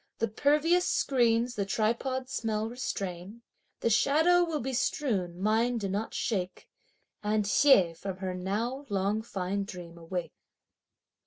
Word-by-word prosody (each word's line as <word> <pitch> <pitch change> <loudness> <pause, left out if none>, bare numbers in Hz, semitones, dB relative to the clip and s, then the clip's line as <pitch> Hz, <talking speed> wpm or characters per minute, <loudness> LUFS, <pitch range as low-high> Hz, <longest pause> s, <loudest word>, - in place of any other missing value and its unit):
The 230 - 0
pervious 300 - +2
screens 240 -2 +2
the 205 - -1
tripod 235 +6 -1
smell 225 -5 -2
restrain. 200 -3 -5 0.4
The 230 - +1
shadow 320 +10 +4
will 325 -3 -2
be 265 +1 -3
strewn, 205 - -1
mind 225 +4 +1
do 195 - -2
not 205 +4 -3
shake 190 -8 -2 0.5
And 210 0 0
(Hsieh) 200 -6 +5
from 190 +1 -6
her 185 -1 -3
now 225 +10 -3
long 200 +2 0
fine 200 -2 -3
dream 175 -3 -9
(awake)! 175 +1 -5
220 Hz, 135 wpm, -29 LUFS, 190-255 Hz, 0.5 s, Hsieh